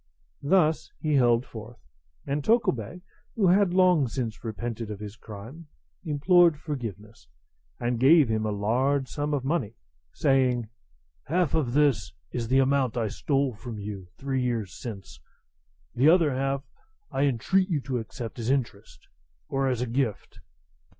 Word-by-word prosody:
Thus 160 +1 +2
he 155 -1 -1
held 120 -2 +3
forth; 110 +1 -10 0.5
and 140 +1 -2
Tokubei, 180 - 0 0.3
who 200 -5 +3
had 195 0 +4
long 180 -6 +4
since 115 -2 -4
repented 115 0 -4
of 105 -2 -6
his 105 0 -7
crime, 115 +10 -10 0.4
implored 165 +1 +4
forgiveness, 110 - -7 0.5
and 120 -1 -1
gave 145 +2 +6
him 110 -1 0
a 110 - -1
large 130 +7 +1
sum 145 +2 -3
of 140 -3 -1
money, 135 -8 -1 0.4
saying, 130 -5 +1 0.6
"Half 170 0 +1
of 135 -7 0
this 135 -11 +2 0.2
is 120 -2 -3
the 130 +3 +3
amount 135 -3 +2
I 115 -2 0
stole 135 +3 0
from 110 +1 -8
you 100 -3 -7
three 135 -1 -2
years 115 -7 -2
since; 95 - -8 0.7
the 140 +5 +4
other 165 -5 +4
half 135 +1 -1 0.5
I 140 - +1
entreat 185 - +1
you 160 -5 +1
to 130 -2 -2
accept 115 +1 -7
as 115 +1 -2
interest, 120 -7 -3 0.4
or 135 0 0
as 125 -2 0
a 125 - -1
gift." 120 -3 -2
130 Hz, 150 wpm, -27 LUFS, 115-145 Hz, 0.7 s, gave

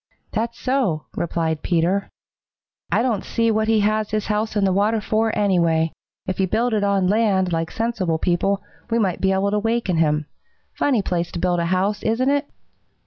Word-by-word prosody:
"That's 230 +2 -3
so," 250 - 0
replied 160 -2 -1
Peter. 180 +3 0 0.8
"I 230 - +2
don't 230 -6 0
see 230 -1 +1
what 220 0 +1
he 220 -1 +3
has 215 +1 +1
his 215 -1 -1
house 215 +1 -1
in 205 - +2
the 190 - +2
water 210 +3 +2
for, 220 +1 0
anyway. 170 -5 +2 0.3
If 185 - -3
he 190 - +2
had - - -8
built 235 +4 +1
it 210 -2 +1
on 200 -2 +2
land, 195 -3 +2
like 165 0 -1
sensible 220 -8 -1
people, 190 +4 0 0.3
we 230 - +1
might 195 -6 0
be 190 - +3
able 195 +1 +1
to 210 - +1
waken 225 -5 0
him. 150 -1 +2 0.5
Funny 250 -8 +1
place 175 -2 -2
to - - -3
build 175 0 +1
a 170 - 0
house, 195 +3 0
isn't 250 +5 +1
it?" 285 0 0
200 Hz, 195 wpm, -22 LUFS, 175-225 Hz, 0.8 s, he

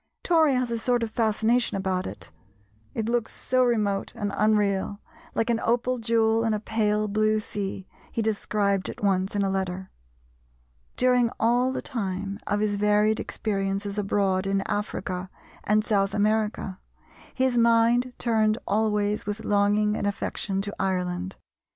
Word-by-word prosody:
Tory 320 -5 +4
has 250 -1 0
a 230 - -1
sort 245 0 +1
of 225 - -3
fascination 225 0 +1
about 190 -1 -1
it, - - -9 0.6
it 220 -1 -2
looks 235 -1 0
so 255 0 +1
remote 210 -5 0
and 205 -1 -3
unreal, 205 -2 +1 0.4
"like 225 +1 +1
an 230 - +1
opal 245 +2 +1
jewel 225 0 +2
in 225 -1 +1
a - - -2
pale 215 -1 0
blue 215 +1 +2
sea," 195 -2 -5 0.2
he 230 - -1
described 205 -2 0
it - - -8
once 195 0 +1
in 200 - +1
a 195 - +1
letter. 190 -1 -3 1.1
During 250 -2 +3
all 245 +3 +3
the - - -4
time 200 -5 -3
of 205 0 0
his 205 -1 0
varied 210 +1 +3
experiences 200 0 -2
abroad 195 -2 +1
in 195 0 +1
Africa 190 -2 -3 0.4
and 215 +1 +2
South 200 -1 +1
America, 210 -2 0 0.6
his 260 -1 +2
mind 235 +1 +3
turned 220 -2 +2
always 210 0 0
with 210 +2 -4
longing 205 +1 +2
and 205 - -1
affection 200 -1 -2
to 205 0 -5
Ireland. 185 -1 -2
210 Hz, 150 wpm, -26 LUFS, 200-230 Hz, 1.1 s, Tory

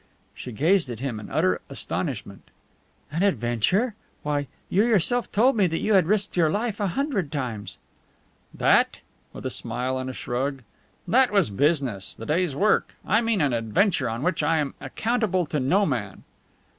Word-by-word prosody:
She 125 - -8
gazed 165 - +2
at 120 -3 -5
him 125 -4 -3
in 105 - -9
utter 90 0 +1
astonishment. - - -4 0.6
"An 165 +3 -1
adventure? 180 - +1 0.3
Why, 145 -1 -1 0.2
you 200 +4 +3
yourself 235 +2 +1
told 240 +5 +4
me 200 -4 +3
that 165 -1 -2
you 215 - +1
had 185 -5 +5
risked 205 +1 +1
your 165 -3 +3
life 210 +4 -2
a 205 - +1
hundred 205 - -1
times!" 120 -8 -4 0.7
"That?" - - +3 0.3
with - - -10
a - - -1
smile 130 +2 -2
and 130 0 -4
a - - -5
shrug. 130 +2 -3 0.4
"That 260 +1 +4
was 195 - +2
business, 135 - 0
the 115 - -8
day's 160 0 0
work. 210 +7 +2
I 215 - +3
mean 225 -5 +1
an 140 -4 +2
adventure 125 - +1
in 115 +4 -4
which 180 -1 +1
I 160 +2 +2
am 145 -3 -1
accountable 220 -6 0
to 150 0 -2
no 185 +11 +3
man." 115 - -3
160 Hz, 170 wpm, -25 LUFS, 130-205 Hz, 0.7 s, had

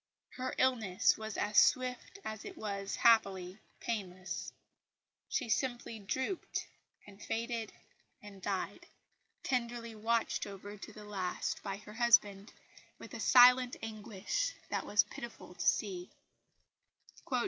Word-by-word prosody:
Her 255 0 -4
illness 230 -8 +3
was 220 -1 -6
as 210 0 +4
swift 255 +7 +2
as 220 -1 -5
it - - -8
was, 200 -2 -3
happily, 195 -4 +3 0.2
painless. 190 -5 -4 0.8
She 260 - -1
simply 240 -1 -1
drooped 260 - -2 0.4
and 205 0 -14
faded 230 -1 -2 0.5
and 200 -2 -12
died, 195 -1 -3 0.6
tenderly 235 -2 -2
watched 225 0 0
over 200 +1 -8
to 210 - -9
the 210 0 -11
last 190 -3 -2
by 195 -1 -4
her 210 +1 -12
husband 215 -4 +4 0.5
with - - -11
a - - -5
silent 250 0 +7
anguish 225 - -2
that - - -2
was 205 0 +5
pitiful 235 -5 -9
to 175 - -3
see. 185 -4 +1
215 Hz, 120 wpm, -34 LUFS, 200-235 Hz, 0.8 s, silent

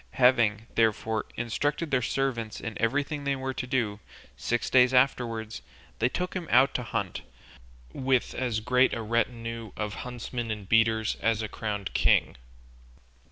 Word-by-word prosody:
Having, 115 -4 +3
therefore, 110 -1 +1
instructed 145 +7 -1
their 130 -2 +3
servants 115 -4 -2
in 110 -2 -5
everything 145 +5 0
they 140 -1 0
were 130 0 -3
to 125 - -4
do, 115 -6 -1 0.4
six 115 - -1
days 125 0 +5
afterwards 115 -4 +1 0.4
they 120 - +3
took 180 +6 -3
him 180 -3 -4
out 130 +3 +5
to - - -1
hunt, 120 - -3 0.7
with 130 -2 +1
as 120 -4 -1
great 125 +3 +3
a 115 - -4
retinue 115 0 -2
of 105 -1 -3
huntsmen 120 -1 -5
and 105 -3 -4
beaters 110 0 +2
as 110 -1 +1
a - - -2
crowned 105 -3 -4
king. - - +3
115 Hz, 150 wpm, -28 LUFS, 110-130 Hz, 0.7 s, days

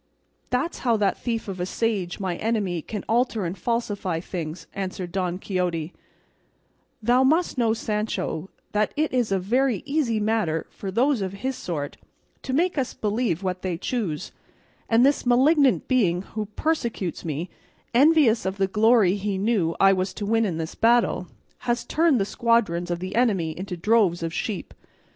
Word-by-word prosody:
"That's 255 +7 -1
how 235 -3 +2
that 205 -2 +1
thief 230 -3 -3
of 190 -2 -5
a 180 - -1
sage, 200 -5 -1
my 185 -3 -2
enemy, 205 -6 -1
can 210 +5 -6
alter 230 -3 +1
and 170 +2 -3
falsify 205 -5 -2
things," 165 -1 -6
answered 185 -2 -4
Don 180 -1 -1
Quixote; 180 -4 -2 1.1
"thou 245 +3 +4
must 320 +7 +2
know, 230 -3 +2
Sancho, 210 -5 -2 0.2
that 210 0 0
it 310 -2 0
is 245 -5 +1
a 195 - +3
very 240 +5 +1
easy 280 -6 0
matter 210 -7 0
for 195 - -6
those 245 +4 +2
of 190 -1 -3
his 260 +7 -3
sort 160 - -4 0.4
to 265 - -5
make 330 +3 +1
us 260 - -2
believe 210 -4 -1
what 185 -1 -2
they 180 -3 -2
choose; 185 -6 -3 0.6
and 230 +2 +5
this 280 +1 +2
malignant 265 +3 +4
being 190 -9 +2
who 215 +1 -5
persecutes 230 - -2
me, 165 +2 -4 0.4
envious 275 -3 +5
of 190 +1 -3
the 195 - +2
glory 210 -1 +4
he 200 -1 -2
knew 190 -5 +1
I 195 0 +6
was 185 0 -2
to 205 - -4
win 225 +2 +2
in 175 -6 -2
this 160 -1 -4
battle, 230 -5 +2 0.3
has 240 -1 -1
turned 320 -5 +3
the 195 - +1
squadrons 210 -7 +1
of 175 - -1
the 185 +1 -4
enemy 195 -10 +1
into 180 0 -5
droves 190 -3 +2
of 165 0 -3
sheep. 205 0 -4
210 Hz, 170 wpm, -24 LUFS, 180-240 Hz, 1.1 s, I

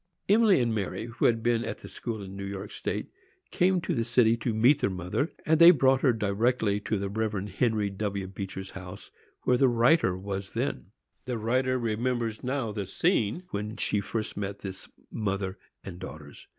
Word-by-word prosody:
Emily 210 -3 +5
and 120 -2 +1
Mary, 100 0 -3
who 115 0 -2
had 115 -2 +3
been 120 -1 +2
at 115 - -6
school 110 -4 -5
in 95 0 -9
New 100 - -6
York 100 +1 -6
State, - - -4 0.4
came 185 0 +3
to - - -2
the 115 - 0
city 120 -1 +4
to 115 +1 -2
meet 120 +7 +4
their - - +2
mother, 90 - -2
and 160 0 +3
they 170 0 +11
brought 135 -5 +4
her 135 - +5
directly 110 0 +1
to 105 +1 -2
the 100 0 -2
Rev. 105 -1 -2
Henry 105 0 0
W. 100 -1 -3
Beecher's 95 0 -6
house, 95 -1 -10 0.3
where 125 - +3
the 135 - +5
writer 120 - +4
then 95 +1 -8
was. 100 -1 -4 0.8
The 125 -2 -2
writer 130 +4 +1
remembers 115 -1 -1
now 130 -3 -1
the 100 -2 -4
scene 170 - +1
when 105 +2 -4
she 105 - +1
first 110 +2 -4
met 100 0 -4
this 95 -1 -7 0.2
mother 100 -3 -2 0.2
and 90 -2 -8
daughters. 80 -5 -10
110 Hz, 185 wpm, -28 LUFS, 100-125 Hz, 0.8 s, they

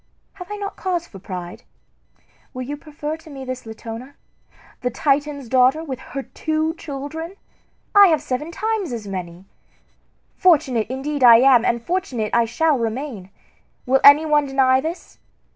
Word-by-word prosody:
Have 375 0 -10
I - - -3
not 405 -1 -6
cause 355 -3 -2
for 195 - -13
pride? 180 -2 -7 0.9
Will 255 - -4
you 285 +4 -5
prefer 300 +1 -6
to 320 0 -16
me 270 -2 -8
this 255 -2 -6
Latona, 225 +4 -8 0.7
the 250 - 0
Titan's 285 +1 -1
daughter, 260 +5 +3
with 265 -5 -6
her 275 +1 -7
two 315 +2 -2
children? 320 +3 -7 0.6
I 405 -1 +8
have 320 -4 +3
seven 265 +5 -4
times 430 - -2
as 220 -3 -6
many. 180 -1 -7 0.9
Fortunate 275 - +3
indeed 270 +2 -3
am 245 +1 +7
I, - - +2
and 235 -1 -2
fortunate 265 - -2
I 235 0 +4
shall 290 +4 +1
remain! 230 -4 -4 0.6
Will 265 +1 +2
any 285 +3 +8
one 295 -2 +2
deny 265 -1 +3
this? 330 +4 -7
275 Hz, 155 wpm, -21 LUFS, 240-315 Hz, 0.9 s, I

